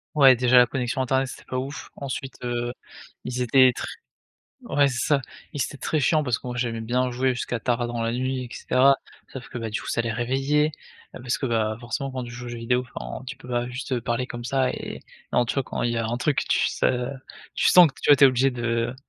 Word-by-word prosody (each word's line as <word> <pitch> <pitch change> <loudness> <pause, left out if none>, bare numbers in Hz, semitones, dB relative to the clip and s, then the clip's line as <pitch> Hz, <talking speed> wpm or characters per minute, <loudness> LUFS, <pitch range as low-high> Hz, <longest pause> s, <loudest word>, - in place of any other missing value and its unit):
Ouais, 135 -4 +8
déjà, 125 +1 +5
la 125 - +6
connexion 125 0 -2
internet, 130 +1 +1
c'était - - -10
pas 130 - -4
ouf. 135 +3 -5
Ensuite, 135 -1 -5
heu, 120 0 -2 0.5
ils 125 0 -3
étaient 130 +1 +6
tr - - -5 0.8
ouais, 145 -1 +3
c'est 125 -3 -1
ça. 140 -3 +2 0.3
Ils 145 - 0
étaient 145 - -5
très 155 - -1
chiants 150 +3 +3
parce 125 -4 0
que - - -12
moi, 125 0 -4
j'aimais 115 -2 -2
bien 125 +2 0
jouer 130 +1 +1
jusqu'à 120 0 -3
tard 120 0 0
dans 120 -1 -3
la 115 0 0
nuit, 130 +1 -2
et - - -9
cetera, 135 +2 +4 0.4
sauf 135 - -8
que, - - -9
bah, 115 -2 -4
du 105 - -2
coup, - - -8
ça 120 - 0
les 115 0 -2
réveillait, 135 +6 +1 0.5
heu, - - -7
parce 125 -1 -1
que, 135 - -2
bah, 110 -2 0
forcément, 125 +3 -3
quand 130 -1 -4
tu 120 - -8
joues 125 0 -8
aux - - -5
jeux 120 - -6
vidéo, 125 +2 0
enfin, 130 - -6
tu 135 +1 -7
peux 125 - -13
pas 120 0 -1
juste, 130 +2 -6
heu, 120 -2 0
parler 120 +2 -1
comme 120 -2 -7
ça 130 0 +1
et - - -6 0.3
en 120 - +3
tu - - -2
vois, 135 - +1
quand - - -4
il 120 - +1
y 120 - -2
a 115 -1 0
un 120 - -2
truc, 145 +2 +1
tu - - +2
s - - -5
heu, 125 -1 +2 0.5
tu - - +3
sens 180 -2 +8
que, 135 - -12
tu - - +3
vois, 145 - +9
tu 140 - +7
es - - +11
obligé 130 +1 +3
de 120 0 -1
125 Hz, 260 wpm, -25 LUFS, 120-135 Hz, 0.8 s, es